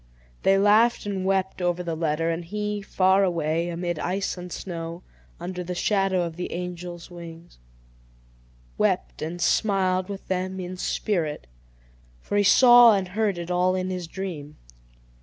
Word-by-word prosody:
They 195 0 +4
laughed 215 +4 +4
and 195 -2 -3
wept 190 -1 0
over 175 0 0
the 170 -1 -3
letter; 165 +1 0
and 165 +1 -3
he, 210 +3 -3
far 190 0 +3
away, 170 -1 0
amid 175 -1 -3
ice 195 +3 -2
and 180 -1 -9
snow, 170 -1 -6 0.4
under 180 +1 -5
the 180 +1 -5
shadow 195 -1 +1
of 165 -1 -5
the 180 - -4
angel's 175 0 -6
wings, 170 - -11 1.2
wept - - 0
and 170 +3 -4
smiled 185 -1 +1
with 195 -1 -7
them 185 0 -2
in 180 0 -5
spirit; 170 - -2 0.7
for 205 - -5
he 205 - +4
saw 240 +1 +8
and 190 -2 -2
heard 205 -1 0
it 170 +1 -5
all 180 +1 +2
in 185 0 -2
his 180 -2 -4
dream. 165 -6 -6
180 Hz, 155 wpm, -25 LUFS, 170-195 Hz, 1.2 s, saw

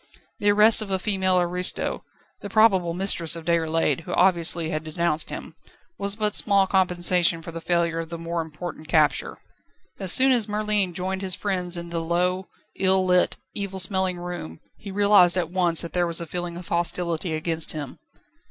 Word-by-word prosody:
The 205 - +1
arrest 215 +2 +5
of 210 - -6
a 190 - 0
female 190 -2 +1
aristo 180 +1 -1 0.4
the 205 - -7
probable 190 -6 +3
mistress 180 -4 +1
of 165 -1 -9
Déroulède, 165 -1 0
who 175 +2 -7
obviously 170 -3 +2
had 155 -1 -3
denounced 160 0 0
him - - -8 0.5
was 200 0 +1
but 210 -1 -1
small 200 -2 +3
compensation 180 -3 +2
for 170 - -8
the 165 0 -7
failure 170 -1 -1
of 165 -1 -6
the 170 - -6
more 165 0 -4
important 160 0 -8
capture. 155 -3 +1 0.6
As 190 -2 +1
soon 265 +1 +6
as 235 -4 +3
Merlin 210 -3 0
joined 190 +1 -3
his 185 -2 0
friends 180 -3 -2
in 170 0 -7
the 170 -1 -3
low, 180 +3 -1 0.3
ill 190 0 +2
lit, 180 -1 +2 0.2
evil 195 -2 -4
smelling 190 -1 0
room 175 - -7 0.2
he 200 - -11
realised 200 -2 +4
at 175 -2 -2
once 175 -3 +1
that 170 - -8
there 175 -1 0
was 170 -1 0
a 170 - -5
feeling 175 +1 -5
of 175 - -10
hostility 170 -1 -1
against 160 0 0
him. 145 -4 -7
180 Hz, 180 wpm, -23 LUFS, 170-190 Hz, 0.6 s, soon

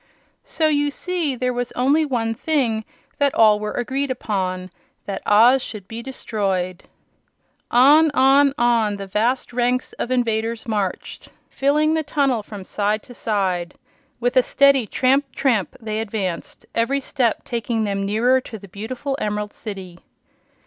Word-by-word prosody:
So 315 - 0
you 290 -1 +2
see 330 -2 -2
there 250 0 -1
was 245 0 -3
only 285 +5 +2
one 230 -5 -1
thing 230 -5 0 0.3
that 280 -1 +2
all 215 -2 +5
were 210 0 -4
agreed 270 +3 -2
upon 185 -7 -3 0.3
that 200 - -4
Oz 240 +6 +6
should 210 -6 -8
be 225 +2 -6
destroyed. 195 -7 -3 0.8
On, 290 +6 +6
on, 275 +1 +5
on 230 -3 +2
the 200 0 -6
vast 230 +7 -1
ranks 245 +1 0
of - - -2
invaders 230 -2 -1
marched, 205 -4 -3 0.2
filling 300 +3 +2
the 320 - +1
tunnel 280 -6 0
from 205 -2 -10
side 210 +2 -1
to 245 - -13
side. 185 -6 -2 0.4
With 245 +1 0
a 255 - +7
steady 275 -2 +3
tramp, 270 +4 +1
tramp, 235 -8 0
they 215 -2 -3
advanced, 200 -5 -4
every 230 +5 +1
step 250 -4 -1
taking 230 -1 -2
them 200 -1 -1
nearer 235 +6 +2
to 225 - -9
the 200 -1 -13
beautiful 240 +8 -5
Emerald 210 0 -2
City. 190 -5 -8
235 Hz, 150 wpm, -21 LUFS, 210-265 Hz, 0.8 s, a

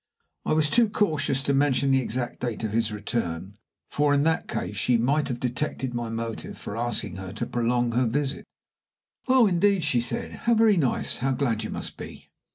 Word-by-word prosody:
I - - +2
was 155 -1 +3
too 235 -2 +4
cautious 145 -10 0
to 140 - +1
mention 140 -1 +2
the 135 0 +4
exact 120 0 -3
date 120 -2 -3
of 110 - -1
his 115 0 0
return, 105 -3 -4 0.3
for 145 0 +2
in 140 - +3
that 160 +1 +1
case 105 - -3
she 120 +5 +2
might 140 +5 +1
have 125 -3 -3
detected 125 +1 -2
my 120 -1 -3
motive 115 0 -5
for 100 - -6
asking 115 -5 -2
her 95 0 -6
to 110 - -3
prolong 120 0 0
her 125 +1 +2
visit. 140 +4 -2 0.8
"Oh, 255 -2 +6
indeed?" 195 -1 +3
she 135 -5 +2
said. 120 - -3 0.2
"How 235 - +5
very 220 -2 +5
nice. 140 -8 0
How 135 +1 0
glad 120 -4 0
you - - -4
must - - -6
be." - - -10
125 Hz, 195 wpm, -26 LUFS, 115-145 Hz, 0.8 s, Oh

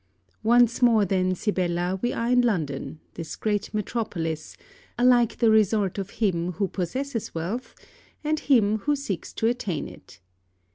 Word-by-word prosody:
Once 240 +2 +4
more 230 -4 +5
then, 185 -1 +1
Sibella, 180 -2 -1
we 240 - 0
are 235 +1 -1
in 250 0 +5
London, 155 - -2
this 165 -2 -6
great 210 -2 -1
metropolis, 180 -7 -3 0.4
alike 240 -1 +4
the 230 -2 +4
resort 210 -2 +2
of 195 0 -4
him 180 -5 0
who 195 +3 -1
possesses 230 +7 -4
wealth 190 +10 -4 0.5
and 310 +1 0
him 220 -7 +3
who 290 +7 +1
seeks 240 -11 -4
to - - -2
attain 210 - -1
it. - - -14
210 Hz, 145 wpm, -25 LUFS, 180-240 Hz, 0.5 s, more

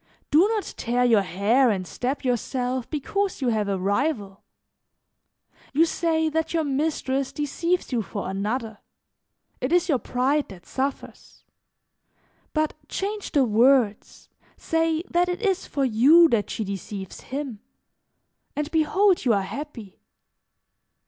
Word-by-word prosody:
"Do 320 +7 +6
not 435 -2 -1
tear 245 +1 +1
your 225 -4 +5
hair 205 +8 +2
and 190 -4 -1
stab 255 +9 -3
yourself 250 0 -1
because 385 +6 -2
you 260 -3 0
have 215 -3 0
a 195 - 0
rival. 200 0 -1 1.3
You 320 +4 +5
say 320 -1 0
that 320 +1 -1
your 325 - +2
mistress 275 -2 -1
deceives 335 +5 -1
you 240 -3 +1
for 200 -1 -5
another; 215 +3 -3 0.8
it 255 - -2
is 355 +1 +3
your 275 -5 +3
pride 270 +5 0
that 180 -4 -12
suffers; 270 +6 -5 1.1
but 310 -1 0 0.2
change 410 +1 -4
the 280 -3 +4
words, 230 -1 +2 0.3
say 325 0 0
that 355 0 +1
it 360 +5 -3
is 385 -3 0
for 275 -2 0
you 275 +9 +6
that 225 -5 +1
she 220 - -3
deceives 195 -1 -6
him, 265 -5 -5 1.0
and 295 +1 -3
behold 360 +4 +3
you 245 -4 +3
are 200 -2 +1
happy. 235 -3 -8
270 Hz, 135 wpm, -24 LUFS, 220-320 Hz, 1.3 s, Do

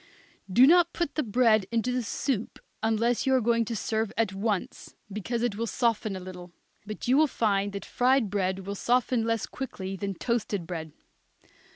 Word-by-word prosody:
Do 245 +7 +7
not 340 +3 +5
put 345 -4 -2
the 310 - 0
bread 220 -4 +3
into 235 +2 0
the 250 0 0
soup 230 0 -2 0.2
unless 225 +3 +1
you 265 - +4
are - - +4
going 230 0 +2
to 230 - -4
serve 220 0 -1
at 220 -4 +1
once, 200 0 -3 0.2
because 230 +3 -2
it 240 -4 0
will 230 +1 -2
soften 225 -4 0
a - - -5
little; 180 -1 -9 0.4
but 215 +2 -6
you 255 - +4
will 310 +1 +5
find 205 -6 0
that 200 - -5
fried 250 -4 +2
bread 190 -2 -1
will 200 - -3
soften 240 +2 +1
less 230 -2 0
quickly 195 -7 -6
than 195 0 -4
toasted 210 -4 -2
bread. 165 -2 -6
225 Hz, 185 wpm, -27 LUFS, 195-245 Hz, 0.4 s, Do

